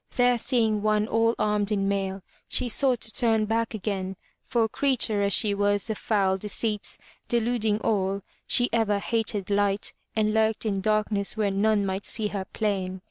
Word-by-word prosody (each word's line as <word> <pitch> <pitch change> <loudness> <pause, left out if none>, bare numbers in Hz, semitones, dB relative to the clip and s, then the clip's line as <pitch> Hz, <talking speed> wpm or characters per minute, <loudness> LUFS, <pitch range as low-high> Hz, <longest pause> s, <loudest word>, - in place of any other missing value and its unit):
There 245 -1 +3
seeing 220 -4 +1
one 215 0 +1
all 230 +1 +2
armed 210 0 0
in 195 -2 0
mail, 195 -1 -2 0.2
she 250 - -1
sought 255 0 +2
to 220 - +1
turn 225 -1 +2
back 225 +1 -1
again, 195 -2 -3 0.3
for 230 -2 +1
creature, 240 -4 +1
as 200 0 +1
she 205 +1 +4
was, 205 +1 +1
of 215 - -4
foul 195 -3 +1
deceits, 210 +1 -2 0.3
deluding 230 -3 +1
all, 195 -2 0 0.2
she 245 - +4
ever 220 -3 +2
hated 210 -2 -1
light 200 0 +1 0.2
and 215 -1 +1
lurked 220 0 +1
in 200 -3 -1
darkness 215 0 0
where 210 -2 +1
none 205 +1 +2
might 190 +1 -3
see 215 -2 0
her 195 -2 -4
plain. 190 -3 -2
210 Hz, 170 wpm, -26 LUFS, 200-225 Hz, 0.3 s, she